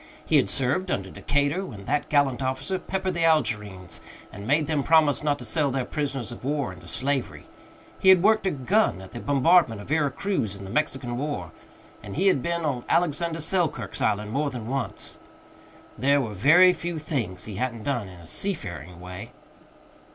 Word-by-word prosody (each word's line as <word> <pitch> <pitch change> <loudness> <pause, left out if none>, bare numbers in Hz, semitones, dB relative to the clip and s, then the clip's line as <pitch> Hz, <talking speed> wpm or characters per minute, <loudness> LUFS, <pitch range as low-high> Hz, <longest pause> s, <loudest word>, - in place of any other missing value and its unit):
He - - +4
had 95 - +2
served 140 - 0
under 95 - -2
Decatur 145 - 0
when 105 - -9
that 145 +5 -1
gallant 140 -3 +2
officer 130 +8 -2
peppered 190 0 -2
the 170 -1 -1
Algerines 105 - 0 0.3
and 100 +1 -8
made 150 +3 +3
them 150 -1 0
promise 155 -1 +4
not 145 -1 +1
to - - -9
sell 155 -4 +2
their 130 -1 -1
prisoners 135 -5 -3
of 120 - -10
war 140 -6 -1
into 85 -1 -14
slavery; 135 +5 -2 0.5
he 190 - +4
had 185 -2 +7
worked 215 -1 +4
a - - +4
gun 170 - +1
at 95 0 -11
the 120 - -7
bombardment 140 - +3
of 100 - -10
Vera 150 -1 +2
Cruz 135 - -2
in 100 - -10
the 95 - -8
Mexican 130 -4 -1
War, 110 - -4 0.5
and 100 -2 -8
he 185 - +1
had 185 -9 +4
been 170 +1 -1
on 130 -5 -1
Alexander 170 0 +1
Selkirk's 165 0 -1
Island 105 +1 0
more 145 +4 0
than 120 -5 -6
once. 135 -1 -4 0.8
There 140 +2 +4
were 115 -6 -3
very 170 - +6
few 175 -1 -4
things 125 - -3
he 105 -3 -7
hadn't 120 -2 -3
done 120 -7 -1
in 90 -2 -12
a - - -13
seafaring 90 - -3
way. 90 0 -9
140 Hz, 190 wpm, -25 LUFS, 110-160 Hz, 0.8 s, had